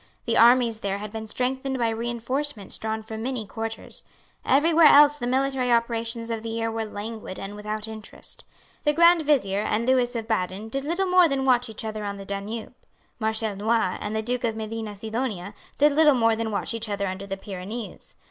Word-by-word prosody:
The 230 -2 0
armies 235 -1 +5
there 200 -2 -2
had 210 0 -7
been 220 0 -6
strengthened 260 +3 -1
by 235 -2 +1
reinforcements 235 +1 -3
drawn 220 0 -3
from 220 0 -7
many 245 -2 -3
quarters. 225 +2 -5 0.4
Every 295 +5 +3
where 325 -1 +8
else 295 0 +7
the 240 - -2
military 260 -1 +1
operations 230 0 0
of 225 -1 -2
the 225 - -5
year 225 0 -2
were 225 0 -2
languid 210 -1 -6
and 195 +1 -6
without 210 +1 -4
interest. 220 -1 -8 0.4
The 295 - +2
Grand 340 +2 +6
Vizier 230 -10 +2
and 215 +2 0
Lewis 250 -1 +2
of 225 -1 -3
Baden 205 0 -2
did 275 +4 -3
little 345 +5 0
more 365 -2 +5
than 270 -1 0
watch 250 -2 +3
each 220 0 -7
other 215 -1 -4
on 200 -1 -4
the 195 - -8
Danube. 200 +4 -5 0.5
Marshal 220 -1 0
Noailles 215 -2 +1
and 210 +1 -3
the 220 - -1
Duke 245 +2 -2
of 225 -2 0
Medina 220 -1 -5
Sidonia 215 -2 -4 0.2
did 295 +1 +5
little 300 -1 +5
more 230 -2 +3
than 225 0 -2
watch 210 +2 -2
each 230 -1 -3
other 200 -1 -1
under 190 +1 -5
the 195 0 -4
Pyrenees. 200 +4 -7
225 Hz, 200 wpm, -25 LUFS, 215-255 Hz, 0.5 s, where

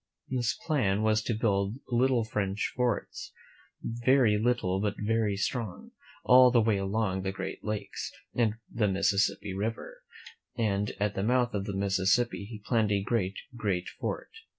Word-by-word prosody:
This 125 -2 0
plan 110 - +1
was 110 0 +3
to 115 +1 -2
build 100 -2 0
little 125 0 +2
French 105 -2 -2
forts, 120 -4 -2 0.5
very 120 -1 +3
little 105 -5 +1
but 105 -1 -1
very 105 -1 0
strong, 110 -1 -3 0.3
all 125 0 +7
the 120 -1 +4
way 110 -2 +2
along 95 0 -1
the 95 0 -2
Great 95 -1 -6
Lakes 105 -1 -4 0.2
and 110 -3 +1
the 110 -2 0
Mississippi 100 0 +1
River; 110 +4 -4 0.6
and 105 -3 0
at 105 0 0
the 95 - -2
mouth 125 +3 +2
of 100 -2 -2
the 100 -1 -3
Mississippi 100 +3 +1
he 105 -3 -9
planned 110 -4 +2
a 100 -1 +1
great, 100 -3 0 0.2
great 100 -6 -1
fort. - - -5
105 Hz, 150 wpm, -29 LUFS, 100-120 Hz, 0.6 s, all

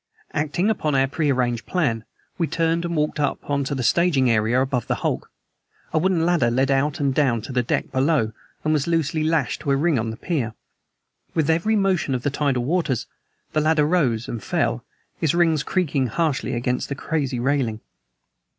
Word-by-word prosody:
Acting 160 +8 +1
upon 155 -9 -1
our 135 0 +4
prearranged 130 -4 0
plan, 120 -12 0 0.3
we 165 - +1
turned 165 +1 0
and 170 0 -2
walked 150 0 0
up 145 -1 -1
on 140 -1 0
to 140 - -2
the 130 - -2
staging 135 -6 +3
above 125 +3 +1
the - - +1
hulk. - - -1 0.6
A 160 - +3
wooden 175 -1 +2
ladder 170 -9 +3
led 130 +3 +1
out 145 +4 +1
and 140 -2 +1
down 125 -6 +1
to 135 - -7
the 125 -1 +1
deck 120 - -1
below, 135 -4 +2 0.3
and 155 - +2
was 150 -1 0
loosely 160 -2 0
lashed 160 -1 0
to 150 - -4
a 140 - +4
ring 150 -1 +2
on 110 0 -2
the 110 - -6
pier. 125 -10 -2 0.8
With 160 -1 +2
every 170 +7 +2
motion 190 -9 +1
of 125 - -4
the 145 - 0
tidal 140 -3 0
waters 150 -6 0 0.5
the 155 - +2
ladder 155 -1 +3
rose 135 -9 +1
and 115 -3 -5
fell, - - 0 0.4
its 160 0 +2
rings 165 -4 +3
creaking 145 -7 0
harshly, 135 0 -1
against 125 +1 -1
the 140 - -2
crazy 140 -4 -2
railing. 125 -4 0
145 Hz, 185 wpm, -23 LUFS, 130-165 Hz, 0.8 s, our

